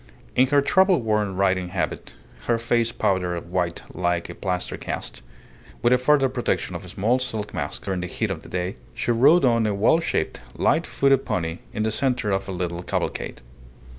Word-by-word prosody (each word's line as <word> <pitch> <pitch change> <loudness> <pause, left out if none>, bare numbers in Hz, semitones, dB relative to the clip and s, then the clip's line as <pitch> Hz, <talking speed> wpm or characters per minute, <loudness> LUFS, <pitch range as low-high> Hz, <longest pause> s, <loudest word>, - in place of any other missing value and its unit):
In 130 - +5
her 140 +1 +3
travel 190 +4 +4
worn 105 -4 0
riding 95 -1 +1
habit, 90 0 -3 0.3
her 115 - +3
face 115 0 +1
powdered 90 -5 -1
white 90 -2 -1
like 85 -1 -1
a - - -7
plaster 90 -2 -3
cast, - - -5 0.6
with 120 +1 +5
a 125 - +4
further 135 +1 +4
protection 125 -2 -2
of - - -6
a - - -10
small 115 +6 +1
silk 110 -5 -3
mask - - -4
during 95 -2 -1
the 90 - -3
heat - - -2
of - - -4
the - - -13
day, 90 +3 -3 0.2
she - - 0
rode 140 +8 +5
on 115 -3 +3
a 105 - 0
well 110 +11 +4
shaped, 165 - -2
light - - +2
footed 135 -1 +3
pony 80 -1 -2
in 105 - -2
the 110 - 0
centre 125 -3 0
of 95 0 -1
a - - -2
little 90 -1 -3
cavalcade. 90 - -3
105 Hz, 195 wpm, -24 LUFS, 90-125 Hz, 0.6 s, In